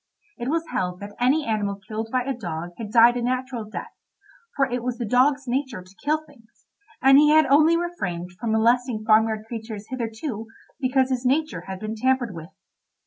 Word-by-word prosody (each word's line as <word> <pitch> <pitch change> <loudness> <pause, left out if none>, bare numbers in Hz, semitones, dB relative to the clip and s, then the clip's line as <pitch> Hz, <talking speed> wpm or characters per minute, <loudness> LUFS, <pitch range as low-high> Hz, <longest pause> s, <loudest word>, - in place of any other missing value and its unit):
It 240 +2 -3
was 330 +2 0
held 180 -1 -2
that 205 0 -8
any 275 +5 +2
animal 205 -3 -1
killed 220 +1 -4
by 255 -1 +1
a 270 +2 -2
dog 175 -7 -5
had 220 -3 -5
died 235 +1 +6
a - - -2
natural 250 -1 -2
death, 215 - -7 0.6
for 275 - +3
it 245 -2 -3
was 245 0 -3
the 235 - -3
dog's 270 +4 +2
nature 255 -5 -2
to 185 +2 -20
kill 305 +2 +1
things, 235 -7 -23 0.4
and 270 +1 +8
he 300 0 +5
had 310 0 +6
only 310 +5 +5
refrained 185 - -4
from 220 +5 -3
molesting 235 0 +2
farmyard 220 0 +3
creatures 220 -2 -7
hitherto 225 -1 -4 0.3
because 260 -1 +1
his 255 -1 -1
nature 305 +5 0
had 190 -1 -6
been 215 0 -4
tampered 255 -1 +1
with. 165 0 -9
240 Hz, 190 wpm, -24 LUFS, 215-265 Hz, 0.6 s, and